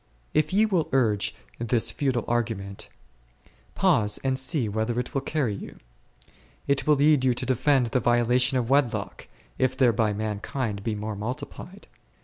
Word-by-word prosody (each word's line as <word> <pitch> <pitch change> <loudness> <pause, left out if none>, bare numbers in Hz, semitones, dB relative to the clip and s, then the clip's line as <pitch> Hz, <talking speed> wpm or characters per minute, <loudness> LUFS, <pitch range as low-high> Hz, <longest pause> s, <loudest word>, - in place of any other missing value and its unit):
If 155 0 +2
ye 210 +3 +4
will 185 -7 0
urge 110 -6 +1 0.2
this 120 0 +1
futile 130 -5 -1
argument, 110 -5 -3 0.9
pause 105 -1 +2
and 130 -1 +1
see 130 -2 0
whither 110 +3 -1
it 125 - -5
will 135 - 0
carry 140 -6 -1
you. 100 - -9 0.9
It 140 0 0
will 150 - +6
lead 145 -1 +4
you 125 -2 +3
to - - -2
defend 130 +1 +2
the 125 - +2
violation 120 +3 +2
of 120 -2 -1
wedlock, 140 -4 0 0.3
if 130 0 +1
thereby 115 -4 +3
mankind 105 +2 -3
may 105 +2 -3
be - - -6
more 105 0 -4
multiplied. 140 - -7
125 Hz, 155 wpm, -26 LUFS, 110-135 Hz, 0.9 s, will